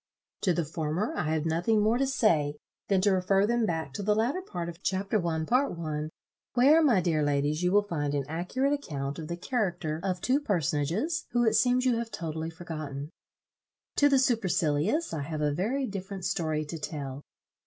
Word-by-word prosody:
To 185 Hz, -, +2 dB
the 170 Hz, -1 st, 0 dB
former 160 Hz, +6 st, -2 dB
I 155 Hz, -, -1 dB
have 160 Hz, -1 st, 0 dB
nothing 175 Hz, +7 st, +2 dB
more 220 Hz, +4 st, +2 dB
to 275 Hz, -, +2 dB
say, 160 Hz, -, +2 dB, 0.3 s
than 195 Hz, -2 st, +3 dB
to 200 Hz, +1 st, +4 dB
refer 195 Hz, +1 st, +3 dB
them 235 Hz, 0 st, +1 dB
back 160 Hz, -5 st, -2 dB
to 205 Hz, -, -4 dB
the 210 Hz, +1 st, +2 dB
latter 245 Hz, -, 0 dB
part 175 Hz, -, -5 dB
of 170 Hz, +1 st, -8 dB
Chapter 195 Hz, +1 st, 0 dB
I., 160 Hz, -2 st, -1 dB
Part 250 Hz, -, +1 dB
I. 155 Hz, -2 st, -3 dB, 0.5 s
where, 285 Hz, +6 st, +6 dB
my 235 Hz, -11 st, +4 dB
dear 165 Hz, -3 st, +1 dB
ladies, 145 Hz, +2 st, +1 dB
you 180 Hz, 0 st, +2 dB
will 205 Hz, +1 st, +4 dB
find 145 Hz, -7 st, -2 dB
an 140 Hz, -2 st, -1 dB
accurate 180 Hz, -, 0 dB
account 140 Hz, -, -4 dB
of 155 Hz, -, -6 dB
the 170 Hz, -, -4 dB
character 175 Hz, -, -2 dB
of 185 Hz, -2 st, -1 dB
two 260 Hz, +7 st, +2 dB
personages, 185 Hz, -, -1 dB
who 240 Hz, 0 st, +3 dB
it 220 Hz, -, +3 dB
seems 250 Hz, +2 st, +3 dB
you 245 Hz, -2 st, +3 dB
have 235 Hz, -1 st, -4 dB
totally 160 Hz, -4 st, -4 dB
forgotten. 155 Hz, -3 st, -6 dB, 0.9 s
To 290 Hz, -, +5 dB
the 275 Hz, -, +4 dB
supercilious 205 Hz, -, +1 dB
I 155 Hz, -, -2 dB
have 155 Hz, +1 st, -4 dB
a 150 Hz, -1 st, +1 dB
very 240 Hz, -, 0 dB
different 195 Hz, -3 st, -6 dB
story 160 Hz, -6 st, -1 dB
to 160 Hz, +2 st, -6 dB
tell. 140 Hz, -3 st, -5 dB
180 Hz, 195 wpm, -28 LUFS, 155-225 Hz, 0.9 s, where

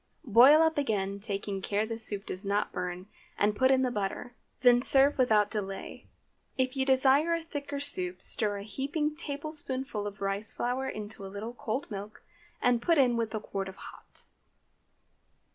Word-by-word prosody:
Boil 260 Hz, +7 st, +7 dB
up 320 Hz, -2 st, +1 dB
again, 200 Hz, -7 st, -1 dB
taking 200 Hz, -2 st, -3 dB
care 205 Hz, +2 st, -1 dB
the 225 Hz, +1 st, -4 dB
soup 210 Hz, -3 st, 0 dB
does 185 Hz, +2 st, -5 dB
not 205 Hz, +1 st, -1 dB
burn, 180 Hz, 0 st, -5 dB, 0.3 s
and 210 Hz, 0 st, +2 dB
put 260 Hz, +4 st, +3 dB
in 265 Hz, 0 st, +4 dB
the 250 Hz, -, 0 dB
butter. 210 Hz, +3 st, -4 dB, 0.3 s
Then 245 Hz, -1 st, +6 dB
serve 275 Hz, +2 st, +4 dB
without 215 Hz, -5 st, +3 dB
delay. 195 Hz, -2 st, -5 dB, 0.5 s
If 260 Hz, 0 st, 0 dB
you 265 Hz, 0 st, -1 dB
desire 275 Hz, +5 st, +4 dB
a 335 Hz, -, -4 dB
thicker 285 Hz, -3 st, -5 dB
soup 185 Hz, -11 st, -1 dB
stir 205 Hz, 0 st, +1 dB
a 200 Hz, -, -7 dB
heaping 290 Hz, +7 st, -2 dB
tablespoonful 280 Hz, -7 st, -4 dB
of 205 Hz, 0 st, -8 dB
rice 200 Hz, +2 st, +1 dB
flour 255 Hz, +2 st, -2 dB
into 210 Hz, -1 st, -7 dB
a -, -, -6 dB
little 210 Hz, +4 st, -6 dB
cold 245 Hz, +2 st, -4 dB
milk, 205 Hz, +1 st, -8 dB, 0.4 s
and 245 Hz, -1 st, +3 dB
put 335 Hz, +5 st, +2 dB
in 250 Hz, -4 st, +4 dB
with 230 Hz, -1 st, -1 dB
the 220 Hz, -, -4 dB
quart 195 Hz, -2 st, -5 dB
of 190 Hz, -, -11 dB
hot. -, -, -11 dB
230 Hz, 175 wpm, -29 LUFS, 205-270 Hz, 0.5 s, Boil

